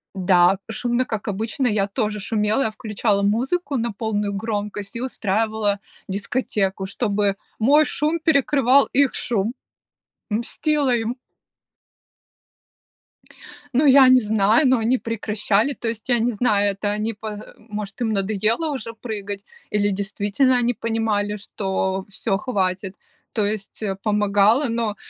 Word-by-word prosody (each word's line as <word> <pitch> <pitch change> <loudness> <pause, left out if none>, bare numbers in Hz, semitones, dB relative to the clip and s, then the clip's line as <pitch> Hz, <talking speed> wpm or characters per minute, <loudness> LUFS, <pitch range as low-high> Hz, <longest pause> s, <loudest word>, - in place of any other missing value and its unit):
да, 185 0 +4
шумно, 240 +3 0
как 220 -2 -5
обычно. 220 +6 -1
Я 205 -3 +1
тоже 210 0 -2
шумела, 210 +4 0
я 220 - -1
включала 210 -1 -1
музыку 265 - 0
на 235 0 -1
полную 210 -1 -2
громкость 205 -1 -4
и 235 - -4
устраивала 215 -3 0 0.3
дискотеку, 195 -1 -1
чтобы 200 -1 0 0.2
мой 290 +7 +5
шум 305 +3 0
перекрывал 280 -3 +4
их 280 -1 +3
шум. 225 0 -1 0.8
Мстила 265 +5 0
им! 235 +1 -1 2.6
Ну 270 +5 +3
я 270 -1 +8
не 255 0 +7
знаю, 215 +5 +3
ну 255 0 +4
они 235 +4 +2
прекращали. 220 +1 0
То 240 - -6
есть, 225 +2 -7
я 245 - +4
не 235 +2 +1
знаю, 205 -3 +2
это 200 +1 -2
они, 215 +2 -2
по, 215 +1 -9
э, 210 0 -8
может 210 -1 -7
им 225 -2 +1
надоело 215 - 0
уже 230 -4 -5
прыгать, 205 -3 -6 0.3
или 205 -1 +1
действительно 205 +6 +1
они 245 0 +1
понимали, 220 -3 -1
что 190 -2 -2
всё, 200 0 -1
хватит. 195 -4 -2 0.4
То 215 -3 +1
есть, 210 +1 -4
э, 195 -2 -1
помогало, 210 +4 +3
но, 230 -2 -1
215 Hz, 135 wpm, -22 LUFS, 205-240 Hz, 2.6 s, я